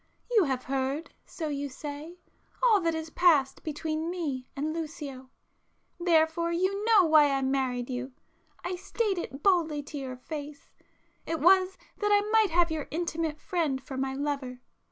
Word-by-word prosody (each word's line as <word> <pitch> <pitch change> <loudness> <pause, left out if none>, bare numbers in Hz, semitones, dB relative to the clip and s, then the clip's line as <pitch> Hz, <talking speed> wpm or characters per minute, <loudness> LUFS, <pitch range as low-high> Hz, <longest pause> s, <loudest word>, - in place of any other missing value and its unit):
You 435 -7 +5
have 260 -2 -1
heard, 270 +4 -2
so 320 - -5
you 285 -1 -3
say, 295 +5 -7 0.5
all 440 -5 +5
that 330 -1 +1
has 320 0 -5
passed 295 -7 +3
between 315 +1 -3
me 290 -8 -3
and 300 +3 -2
Lucio,—therefore 320 +3 -2
you 375 +4 0
know 440 -4 +6
why 310 -2 +6
I 270 -1 0
married 260 -2 0
you. 255 +1 -4 0.5
I 360 0 -3
state 395 0 -1
it 275 -4 -7
boldly 325 -7 +2
to 290 0 -7
your 260 -2 -6
face,—it 300 +3 -8
was 375 +2 +5 0.2
that 415 -1 +1
I 410 0 +4
might 440 -2 +5
have 340 0 +3
your 310 -2 -3
intimate 325 -2 -2
friend 315 -7 -1
for 265 0 -8
my 265 0 -2
lover. 275 -3 -3
315 Hz, 155 wpm, -29 LUFS, 275-350 Hz, 0.5 s, know